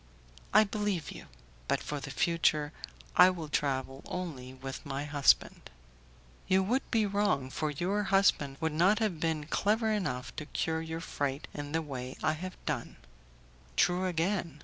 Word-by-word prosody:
"I 215 Hz, +2 st, +7 dB
believe 205 Hz, -5 st, -2 dB
you; -, -, -10 dB, 0.4 s
but -, -, +2 dB
for 145 Hz, -, -4 dB
the 135 Hz, -, -7 dB
future 155 Hz, -1 st, +1 dB, 0.4 s
I 180 Hz, +1 st, +9 dB
will 170 Hz, -4 st, -4 dB
travel 135 Hz, -2 st, -1 dB
only 150 Hz, -9 st, -5 dB
with 130 Hz, 0 st, -7 dB
my 140 Hz, 0 st, -3 dB
husband." 145 Hz, -1 st, +2 dB, 0.8 s
"You 190 Hz, +1 st, +4 dB
would 245 Hz, +8 st, +1 dB
be 225 Hz, -3 st, +3 dB
wrong, 200 Hz, -10 st, +1 dB
for 155 Hz, +2 st, -1 dB
your 190 Hz, +8 st, -1 dB
husband 190 Hz, -9 st, +3 dB
would 160 Hz, -1 st, -1 dB
not 185 Hz, +7 st, +4 dB
have 210 Hz, -8 st, 0 dB
been 160 Hz, -2 st, -1 dB
clever 220 Hz, +7 st, +1 dB
enough 180 Hz, -12 st, -2 dB
to 150 Hz, -, -5 dB
cure 160 Hz, 0 st, -1 dB
your 165 Hz, 0 st, -5 dB
fright 140 Hz, -2 st, -3 dB
in 145 Hz, -1 st, -5 dB
the 165 Hz, +1 st, 0 dB
way 130 Hz, -3 st, -6 dB
I 155 Hz, -, +3 dB
have 185 Hz, +4 st, -6 dB
done." 140 Hz, -6 st, -3 dB, 0.8 s
"True, 180 Hz, -, +3 dB
again. 170 Hz, -3 st, -1 dB
160 Hz, 160 wpm, -31 LUFS, 145-190 Hz, 0.8 s, I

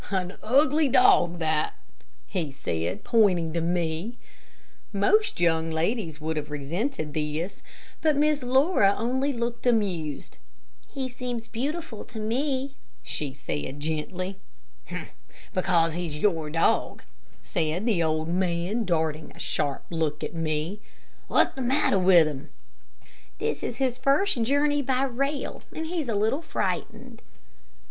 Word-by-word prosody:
"An 185 Hz, -2 st, -1 dB
ugly 290 Hz, +6 st, +4 dB
dog, 175 Hz, -8 st, +5 dB
that," 155 Hz, -2 st, 0 dB, 0.5 s
he 145 Hz, -, -3 dB
said, 85 Hz, -, -3 dB
pointing 185 Hz, -9 st, +3 dB
to 170 Hz, -, 0 dB
me. 170 Hz, +6 st, -1 dB, 0.7 s
Most 425 Hz, -, +2 dB
young 165 Hz, -1 st, +2 dB
ladies 165 Hz, 0 st, -1 dB
would 160 Hz, +1 st, -2 dB
have 150 Hz, -1 st, -3 dB
resented 155 Hz, -, -3 dB
this, 155 Hz, +5 st, -3 dB, 0.4 s
but 310 Hz, -2 st, +3 dB
Miss 300 Hz, 0 st, +3 dB
Laura 255 Hz, -, +4 dB
only 260 Hz, +5 st, 0 dB
looked 235 Hz, -1 st, -3 dB
amused. 185 Hz, -, 0 dB, 0.5 s
"He 270 Hz, -2 st, -3 dB
seems 245 Hz, -2 st, -5 dB
beautiful 280 Hz, 0 st, -4 dB
to 230 Hz, -, -8 dB
me," 265 Hz, +5 st, -1 dB, 0.3 s
she 145 Hz, -3 st, -3 dB
said, 130 Hz, -, -5 dB
gently. 175 Hz, +5 st, -3 dB, 0.5 s
"H'm, -, -, -6 dB, 0.4 s
because 170 Hz, -3 st, +2 dB
he's 165 Hz, -3 st, -3 dB
your 160 Hz, -4 st, +1 dB
dog," 165 Hz, +2 st, +1 dB, 0.4 s
said 165 Hz, +5 st, -1 dB
the 210 Hz, -8 st, +2 dB
old 155 Hz, -1 st, +1 dB
man, 180 Hz, +5 st, 0 dB
darting 160 Hz, -3 st, -1 dB
a -, -, -15 dB
sharp 140 Hz, -1 st, -1 dB
look 160 Hz, -3 st, -1 dB
at -, -, -4 dB
me. 165 Hz, +4 st, -2 dB, 0.5 s
"What's -, -, +3 dB
the 265 Hz, -, -6 dB
matter 250 Hz, -5 st, +2 dB
with 180 Hz, -3 st, +7 dB
him?" 145 Hz, -3 st, -5 dB, 0.9 s
"This -, -, -2 dB
is -, -, -3 dB
his 255 Hz, -2 st, 0 dB
first 275 Hz, +2 st, +2 dB
journey 285 Hz, +4 st, +2 dB
by 260 Hz, -1 st, +1 dB
rail, 275 Hz, +2 st, -2 dB
and 320 Hz, -, -4 dB
he's 320 Hz, -5 st, -2 dB
a 220 Hz, -, 0 dB
little 220 Hz, +9 st, +1 dB
frightened." 225 Hz, -, -3 dB
195 Hz, 135 wpm, -26 LUFS, 160-255 Hz, 0.9 s, with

